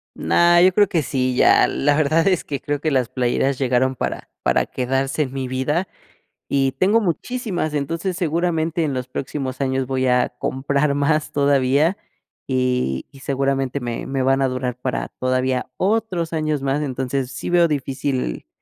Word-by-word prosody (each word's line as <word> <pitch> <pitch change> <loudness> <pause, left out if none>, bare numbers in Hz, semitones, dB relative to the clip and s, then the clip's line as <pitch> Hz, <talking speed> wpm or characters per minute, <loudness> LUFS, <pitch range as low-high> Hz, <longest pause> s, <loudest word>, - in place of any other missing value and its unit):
No, 175 - +4
yo 185 +1 +6
creo 205 -2 +5
que 165 - 0
sí, 130 -2 -1
ya, - - +5
la 145 +1 +1
verdad 155 +3 +2
es 185 -4 +2
que 140 -2 -4
creo 145 -1 -2
que 155 0 -1
las 130 -3 +1
playeras 130 +1 0
llegaron 130 0 +1
para - - -4
para - - +2
quedarse 135 +3 -1
en 130 -1 -7
mi 135 -1 -3
vida, 150 +8 -1 0.6
y 135 -1 +1
tengo 195 +10 +3
muchísimas. 190 - -2
Entonces, 165 +6 -2
seguramente 165 -1 0
en 140 -3 -1
los 130 0 -4
próximos 130 0 -4
años 130 -1 0
voy 130 0 -1
a 125 0 +3
comprar 140 +2 0
más 150 +2 0
todavía, 140 +4 +2 0.5
y 125 - 0
y 135 - -16
seguramente 135 0 -1
me 120 -1 -4
me 135 -1 -1
van 135 +1 +2
a 135 - +3
durar 125 -1 -3
para 130 - -2
todavía 130 0 0
otros 190 -5 0
años 155 -3 -1
más. 140 +2 0
Entonces, 130 -1 -2
sí - - -5
veo 175 -1 +5
difícil 135 - -2
140 Hz, 170 wpm, -21 LUFS, 130-160 Hz, 0.6 s, yo